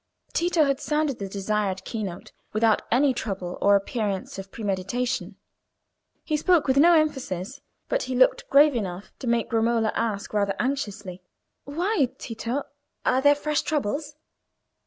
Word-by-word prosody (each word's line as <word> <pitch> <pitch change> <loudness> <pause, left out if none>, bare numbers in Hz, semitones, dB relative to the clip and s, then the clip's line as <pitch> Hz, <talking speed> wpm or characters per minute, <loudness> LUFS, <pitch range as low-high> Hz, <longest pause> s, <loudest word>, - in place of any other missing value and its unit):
Tito 340 -1 +2
had 275 -2 +1
sounded 300 -4 0
the 195 -1 -4
desired 200 -1 -2
key 225 - -4
note 180 -4 -6 0.2
without 220 0 +3
any 270 +3 +4
trouble, 190 -6 -4
or 200 0 +5
appearance 200 -2 -2
of 195 0 -9
premeditation. 225 +5 -2 0.9
He 310 - -1
spoke 345 +1 +3
with 265 0 +2
no 335 +4 +7
emphasis, 265 - -1 0.3
but - - 0
he 255 - -3
looked 255 +1 +3
grave 290 +1 +6
enough 190 -4 -4
to 255 - -6
make 235 -1 0
Romola 225 -1 +2
ask 210 -3 -2
rather 200 -2 +1
anxiously— 205 -8 -3 0.4
"Why, 330 - 0
Tito? 235 +4 -4 0.4
Are 260 - +3
there 290 +1 +6
fresh 300 0 0
troubles?" 295 +1 -2
235 Hz, 145 wpm, -25 LUFS, 200-285 Hz, 0.9 s, no